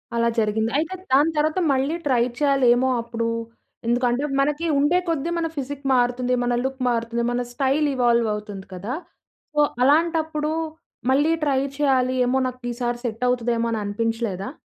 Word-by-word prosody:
అలా 235 0 +2
జరిగింది. 220 +1 0
అయితే, 315 +5 -1 0.2
దాని 295 +4 +5
తరువాత 310 +4 +1
మళ్ళీ 270 +4 0
ట్రై 245 -3 +3 0.2
చేయలేమో 260 -3 +3
అప్పుడు 230 0 -3 0.6
ఎందుకంటే, 245 +2 +1 0.2
మనకి 295 +4 +1
ఉండే 295 +5 +3
కొద్ది 325 0 -1
మన 335 -1 0
ఫిజిక్ 280 0 -5
మారుతుంది, 250 0 +1
మన 245 0 0
లుక్ 265 0 -3
మారుతుంది, 235 0 -1
మన 245 0 0
స్టైల్ 275 +3 +1
ఇవాల్వ్ 235 -2 +3
అవుతుంది 210 -2 -7
కదా! 200 +8 -4 0.6
సో, 300 - +3 0.2
అలాంటప్పుడు 310 +1 +2 0.6
మళ్ళీ 290 +4 +3
ట్రై 275 -3 +2 0.2
చేయాలి, 260 -3 +2
ఏమో 255 +2 +2
నాకు 255 0 -7
ఈసారి 240 0 -2
సెట్ 230 +1 -3
అవుతదేమో 235 -1 0
అని 225 - -1
అనిపించలేదా? 225 -1 -2
250 Hz, 145 wpm, -23 LUFS, 235-285 Hz, 0.6 s, దాని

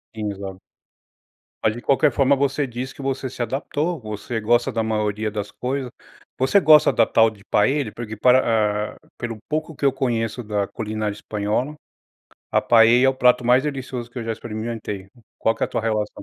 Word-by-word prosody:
Sim, 105 -1 -3
exato. 95 -1 -7 1.0
Mas 110 - +3
de 120 - -7
qualquer 140 +2 +3
forma 135 +2 +3
você 140 +1 0
diz 125 +2 -6
que - - -11
você 135 -1 -2
se 125 - -7
adaptou, 145 +7 -2
você 110 +2 -5
gosta 120 +4 +2
da 115 -2 -1
maioria 105 -1 -1
das 105 -1 -5
coisas. 130 0 -3 0.5
Você 135 +10 +4
gosta 155 -4 +6
da - - +3
tal 115 0 +4
de 105 -3 -16
paella? 130 +2 +1
Porque 110 -2 -6
pra 110 -3 +2
eh, - - -26
pelo 115 -2 -5
pouco 155 +1 -2
que 140 - -3
eu 140 - +5
conheço 120 -2 -1
da 105 -2 -1
culinária 110 -1 -3
espanhola, 105 +7 -2 0.8
a - - +3
paella 115 +2 +5
é - - +5
o 135 - +2
prato 125 -1 +3
mais 125 +2 +4
delicioso 130 -4 -5
que 125 - -7
eu 115 - -4
já 115 - -2
experimentei. 110 -3 -5 0.3
Qual 115 - +2
que - - -8
é - - +3
a - - -15
tua - - -2
relação 110 -2 -2
120 Hz, 190 wpm, -22 LUFS, 105-130 Hz, 1.0 s, gosta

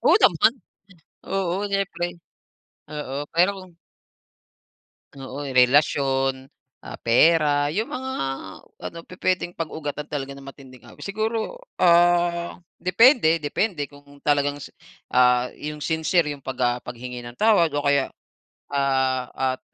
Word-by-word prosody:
Oo - - +6
naman. 185 +4 +5 0.7
Oo, 190 -2 -1
siyempre. 195 -3 -1 0.8
Oo, 145 -1 -4
pero 175 +4 +4
kung 185 -2 -13 1.4
Oo, 135 +1 -7
'yung 135 -2 -5
relasyon, 135 0 +2 0.3
ah, - - -9
pera, 145 +3 +4
'yung 210 +9 -1
mga 260 +1 -4 0.8
ano - - -14
pupuwedeng 180 -1 -2
pag-ugatan 150 -3 -5
talaga 140 -2 -4
ng 140 0 -12
matinding 130 -3 -14
away. 110 - -12
Siguro, 220 - -3 0.2
ah, 175 -1 +3 0.2
depende 185 - +5
depende 150 +1 -1
kung 145 0 -17
talagang, 145 -1 +2 0.6
ah, 125 0 +4
'yung 150 0 -6
sincere 160 -1 +1
'yung 145 - -10
'pag, 130 -1 -6
ah, 120 0 +1
paghingi 125 +1 -7
ng 120 0 -10
tawad 205 -7 +4
o 145 - -1
kaya, 140 -1 +2 0.6
ah, 130 -2 0 0.2
at - - -27
145 Hz, 120 wpm, -23 LUFS, 135-175 Hz, 1.4 s, Oo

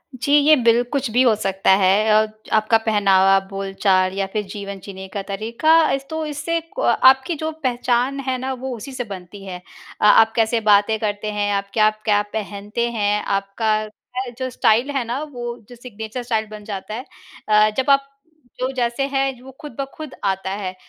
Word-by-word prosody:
जी। 255 +3 -3
ये 295 +1 +6
बिल 235 -3 +3
कुछ 275 -3 -1
भी 245 +3 +3
हो 235 - +5
सकता 195 -2 +1
है 200 +3 +3
अ, 215 0 +4 0.3
आपका 215 +1 +4
पहनावा, 195 -3 +4
बोलचाल 195 -1 0
या 195 - 0
फिर 215 - -1
जीवन 200 -1 -6
जीने 190 -1 -8
का 200 - -3
तरीका। 220 +10 -1 0.2
अस 275 0 -3
तो 315 0 -3
इससे 300 +3 -2 0.2
क - - +2 0.2
आपकी 265 +6 -5
जो 315 +1 -3
पहचान 250 +1 0
है 260 -1 0
ना 260 +1 -3
वो 260 0 -5
उसी 250 +5 -9
से 255 -1 -4
बनती 195 -2 -10
है। 180 -2 -7 0.4
अ, - - +3
आप 225 +1 +6
कैसे 225 0 +1
बातें 205 +2 +4
करते 210 0 -2
हैं, 205 0 -1
आप 200 0 -2
क्या-क्या 215 -1 +2
पहनते 210 +2 -3
हैं, 210 -2 0
आपका 200 +2 0
क्या 250 +4 -7
जो 260 0 -2
स्टाइल 240 +1 +2
है 270 -3 -1
ना 240 +5 -3
वो 240 -1 -5
जो 245 - -11
सिग्नेचर 230 0 -7
स्टाइल 225 -3 -1
बन 210 -1 -9
जाता 205 0 -6
है। 245 +4 -6 0.4
अ, 215 0 +5
जब 265 +1 0
आप 275 0 +3 0.5
जो 255 +1 -1
जैसे 240 +1 -1
हैं 270 -2 -1
वो 265 +1 -12
खुद 295 -6 -9
ब 275 - 0
खुद 310 -3 -8
आता 190 -1 -1
है, 190 -1 -4
220 Hz, 190 wpm, -21 LUFS, 205-255 Hz, 0.5 s, ये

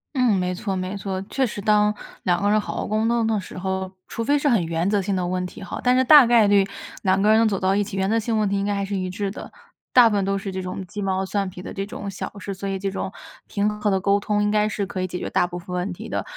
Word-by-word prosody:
嗯， 250 -5 +3
没 180 -1 0
错 195 +1 -3
没 185 +1 -3
错。 195 -1 -3
确 260 +6 0
实 210 -3 -5
当 210 0 +3 0.3
两 175 -1 +1
个 200 - +1
人 215 0 +3
好 - - -6
好 - - -2
沟 215 +1 0
通 235 -1 +2
的 220 -1 +1
时 185 - -9
候， 190 0 -3 0.2
除 230 - -4
非 290 +5 +3
是 290 - 0
很 230 -10 +3
原 165 +2 -1
则 205 -1 +2
性 195 0 -1
的 180 - -1
问 180 +1 -1
题 180 - -11
吼， 185 - -6
但 250 0 +4
是 260 - +4
大 285 -1 +8
概 235 -2 +5
率 200 -1 +5 0.4
两 190 0 +2
个 210 +2 +4
人 220 0 +5
走 195 -3 -1
到 190 +1 +2
一 205 - +2
起， 200 -1 -6
原 190 0 +1
则 225 +3 +2
性 225 0 -1
问 215 - +2
题 200 - 0
应 - - -1
该 205 0 0
还 200 0 -1
是 200 +1 -3
一 185 -1 -2
致 195 +1 -3
的， - - -9 0.4
大 245 -2 +7
部 220 - 0
分 200 - +1
都 195 +1 0
是 195 0 -5
这 190 0 -4
种 185 +1 -5
鸡 205 +3 -7
毛 190 -1 0
蒜 195 0 -1
皮 180 0 -10
的 - - -7
这 195 - -3
种 200 -1 -6
小 190 - -5
事， 200 0 -5
所 195 +1 -5
以 195 - -2
这 195 0 -3
种 190 - -4 0.4
平 205 0 0
和 210 - +2
的 190 -1 +2
沟 200 +2 +2
通， 205 0 0
应 205 - +1
该 210 0 +2
是 205 -2 -2
可 185 -1 -4
以 185 - -1
解 180 - -5
决 - - -5
大 175 - +2
部 175 0 -6
分 180 +1 -6
问 180 +2 -2
题 180 - -8
的， - - -2
200 Hz, 335 characters per minute, -23 LUFS, 190-210 Hz, 0.4 s, 大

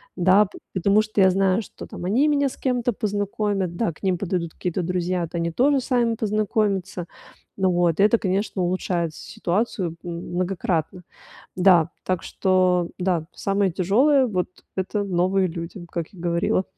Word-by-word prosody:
да. 190 +3 +5
Пот 195 - -13
потому 200 +3 +3
что 215 -1 -3
я 190 -1 +7
знаю, 190 +2 +2
что - - -10
там 175 - -7
они 245 +10 +3
меня 285 -1 +2
с 265 - -6
кем-то 245 -2 0
познакомят, 205 -3 -2
да, 220 0 0
к 150 - -19
ним 185 -3 +1
подойдут 175 -3 -2
какие-то 180 0 -3
друзья, 180 +1 -1
вот 165 - -6
они 170 0 -1
тоже 270 - +3
сами 240 -3 +1
познакомятся. 205 -4 -1 0.5
Ну 190 -1 +3
вот, 175 -1 +1
и - - +6
это, 215 +2 +4
конечно, 190 0 -1
улучшает 175 -2 -1
с - - -12
ситуацию 195 -3 -2
м 175 - -5 0.2
многократно. 180 -1 -1 0.5
Да, 180 -3 +5
так 185 -2 -1
что 185 -2 +2
да, 180 -3 0
самое 195 -1 0
тяжелое- 250 - +3
вот 185 -6 -1 0.3
это 195 +2 -2
новые 185 0 +1
люди, 170 +2 -7
как 170 -2 -3
я 185 - -14
говорила. 175 +4 +1
190 Hz, 170 wpm, -23 LUFS, 175-210 Hz, 0.5 s, я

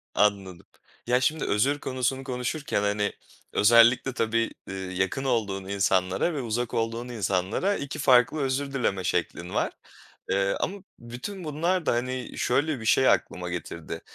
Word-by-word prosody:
Anladım. 100 -4 +1 0.4
Ya, 125 +1 +3
şimdi 155 +4 +1
özür 135 +8 +1
konusunu 130 0 -1
konuşurken, 125 -1 -2
hani, 105 0 0 0.4
özellikle 115 +4 +5
tabii, 115 -1 0 0.2
eee, 95 - -6
yakın 95 +6 -2
olduğun 105 -7 -1
insanlara 95 - +1
ve 145 - -2
uzak 120 0 -2
olduğun 115 +2 -2
insanlara 105 - 0
2 140 -3 -5
farklı 130 +2 +4
özür 135 +1 -1
dileme 100 -8 0
şeklin 90 0 -2
var, - - 0 0.6
eee, 100 0 +1
ama 200 - -2 0.2
bütün 125 +12 -7
bunlar 165 +4 0
da, - - +2
hani, 125 +1 -3
şöyle 140 +3 +1
bir 110 - -8
şey 130 +3 +5
aklıma 90 -1 0
getirdi. 85 -1 -6
120 Hz, 145 wpm, -26 LUFS, 100-135 Hz, 0.6 s, özellikle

